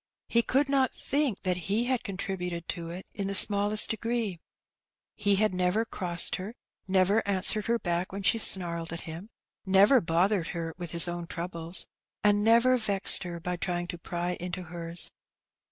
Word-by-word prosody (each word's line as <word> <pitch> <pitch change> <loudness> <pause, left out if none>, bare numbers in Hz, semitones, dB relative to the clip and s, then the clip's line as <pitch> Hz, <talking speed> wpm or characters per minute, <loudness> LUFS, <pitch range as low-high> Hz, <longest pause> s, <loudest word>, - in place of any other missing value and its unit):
He 235 - +2
could 270 +4 +1
not 275 -2 +1
think 280 -7 -1
that 180 -1 -2
he 215 +4 +1
had 250 -2 -1
contributed 180 -5 -5
to 170 -2 -4
it 180 +3 -8
in 200 -1 -4
the 200 - -2
smallest 205 +1 +5
degree. 225 -4 -3 0.8
He 205 -1 +2
had 215 0 +1
never 180 +5 0
crossed 175 -6 0
her, 200 +6 -8 0.3
never 190 +3 +2
answered 200 +1 +2
her 235 0 +2
back 175 -3 -2
when 195 +1 -6
she 225 - +3
snarled 170 -5 +1
at 170 - -5
him, 170 +6 -9 0.3
never 200 +6 +5
bothered 175 +2 +1
her 165 -1 -4
with 175 -2 -7
his 170 +1 +5
own 175 0 -5
troubles, 170 0 -3 0.4
and 205 0 +3
never 235 +3 +4
vexed 205 -4 +2
her 170 -1 -6
by 180 +1 -4
trying 175 0 -3
to 175 - -6
pry 175 +1 -4
into 180 +1 -5
hers. 170 0 +1
185 Hz, 170 wpm, -28 LUFS, 175-215 Hz, 0.8 s, smallest